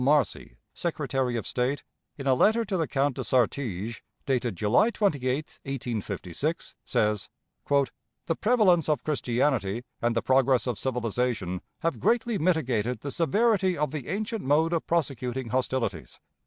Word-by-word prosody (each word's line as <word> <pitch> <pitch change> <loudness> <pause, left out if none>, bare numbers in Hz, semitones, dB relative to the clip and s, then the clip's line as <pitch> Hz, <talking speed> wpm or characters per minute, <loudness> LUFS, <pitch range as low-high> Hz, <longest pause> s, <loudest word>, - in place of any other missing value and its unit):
Marcy, 140 - +1 0.2
Secretary 135 -7 -1
of 115 - -2
State, 130 +3 -1 0.3
in 135 - -6
a 135 - +4
letter 220 - +3
to 195 -2 -2
the 165 -4 0
Count 140 -1 +1
de - - -2
Sartiges, 115 -4 0 0.2
dated 125 -5 0
July 110 - +3
28, 150 - -1
1856, 125 - -3
says: 105 -2 0 0.4
"The 140 +3 -1
prevalence 195 - +3
of 150 -5 +1
Christianity 120 -6 0 0.2
and 120 0 +1
the 115 - +1
progress 130 -1 +3
of 125 -5 -2
civilization 115 -7 -1 0.2
have 165 -1 -1
greatly 235 -2 +1
mitigated 125 - +1
the 140 - -4
severity 190 - +2
of 150 -2 0
the 150 -5 -5
ancient 210 +5 -2
mode 155 +5 +3
of 165 - -1
prosecuting 130 -6 -1
hostilities. 125 -8 -2
135 Hz, 140 wpm, -27 LUFS, 120-165 Hz, 0.4 s, a